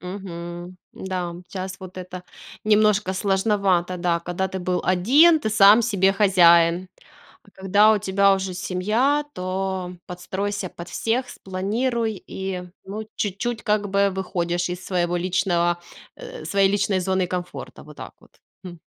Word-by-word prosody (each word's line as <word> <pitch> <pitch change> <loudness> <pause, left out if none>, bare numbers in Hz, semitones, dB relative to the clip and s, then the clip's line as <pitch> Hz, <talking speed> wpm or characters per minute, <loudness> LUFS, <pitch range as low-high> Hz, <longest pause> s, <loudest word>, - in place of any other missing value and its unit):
Мгм. 175 -1 -7 0.2
Да, 180 -2 -4
щас 190 0 -6
вот 185 0 -10
это 185 0 -8 0.4
немножко 210 -2 +3
сложновато. 190 -2 +1
Да, 175 -1 0
когда 180 +2 -3
ты 190 - -5
был 180 0 -1
1, 275 - +5
ты 220 - -2
сам 210 +2 +7
себе 195 -4 +2
хозяин. 175 -3 +4 0.5
А - - -22
когда 205 +3 +5
у 215 - +2
тебя 195 0 +3
уже 190 -1 -4
семья, 210 +11 0
то 185 0 -3
подстройся 190 +2 -4
под 170 0 -10
всех, 250 +3 -1
спланируй 220 +3 -2
и, 190 -1 -4 0.2
ну, 210 +2 -7
чуть-чуть 220 +4 -3
как 210 -1 0
бы 200 0 +2
выходишь 175 -2 -2
из 180 0 -6
своего 175 -2 -1
личного, 175 -1 +1 0.4
э, - - -9
своей 195 -1 +2
личной 205 -1 +1
зоны 190 0 0
комфорта. 180 0 -6
Вот - - -14
так - - -9
вот. - - -24 0.2
Хм. 175 -2 -9
190 Hz, 145 wpm, -23 LUFS, 180-205 Hz, 0.5 s, сам